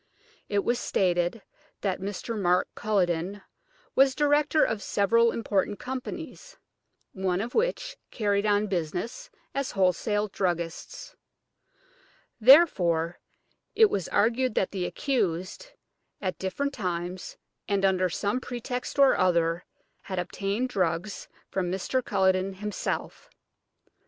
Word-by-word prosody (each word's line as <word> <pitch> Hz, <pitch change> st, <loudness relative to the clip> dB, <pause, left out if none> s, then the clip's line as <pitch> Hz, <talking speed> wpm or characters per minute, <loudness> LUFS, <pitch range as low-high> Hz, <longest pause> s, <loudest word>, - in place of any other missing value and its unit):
It 200 Hz, -1 st, +1 dB
was 240 Hz, 0 st, +1 dB
stated 175 Hz, +1 st, 0 dB, 0.4 s
that 190 Hz, -3 st, -1 dB
Mr. 205 Hz, +4 st, -4 dB
Mark 180 Hz, -3 st, +2 dB
Culledon 190 Hz, -1 st, 0 dB, 0.5 s
was 270 Hz, 0 st, +4 dB
director 295 Hz, +1 st, +3 dB
of 220 Hz, -2 st, 0 dB
several 230 Hz, +4 st, +3 dB
important 205 Hz, -2 st, -1 dB
companies, 315 Hz, -, -7 dB, 0.6 s
one 190 Hz, -1 st, -1 dB
of 230 Hz, +4 st, -4 dB
which -, -, -1 dB
carried 205 Hz, -2 st, 0 dB
on 205 Hz, 0 st, +3 dB
business 195 Hz, -, -3 dB, 0.2 s
as 275 Hz, -1 st, -2 dB
wholesale 205 Hz, +3 st, +1 dB
druggists. 175 Hz, -4 st, -3 dB, 1.2 s
Therefore 180 Hz, -, +5 dB, 0.6 s
it 440 Hz, -2 st, +6 dB
was 190 Hz, -, -1 dB
argued 235 Hz, +3 st, +1 dB
that 190 Hz, -, +1 dB
the 185 Hz, -3 st, -2 dB
accused, 190 Hz, -, -2 dB, 0.5 s
at 185 Hz, -2 st, -3 dB
different 280 Hz, +10 st, -2 dB
times 180 Hz, -4 st, -4 dB, 0.3 s
and 200 Hz, -1 st, +1 dB
under 185 Hz, -1 st, +2 dB
some 205 Hz, +8 st, -1 dB
pretext 250 Hz, +1 st, -5 dB
or 275 Hz, -1 st, +6 dB
other, 170 Hz, -2 st, +2 dB, 0.4 s
had 185 Hz, -, -6 dB
obtained 200 Hz, +7 st, -2 dB
drugs 185 Hz, -1 st, -2 dB, 0.2 s
from 180 Hz, -2 st, -1 dB
Mr. 220 Hz, +7 st, -1 dB
Culledon 190 Hz, -1 st, +1 dB
himself. 210 Hz, +2 st, -4 dB
200 Hz, 110 wpm, -27 LUFS, 185-245 Hz, 1.2 s, it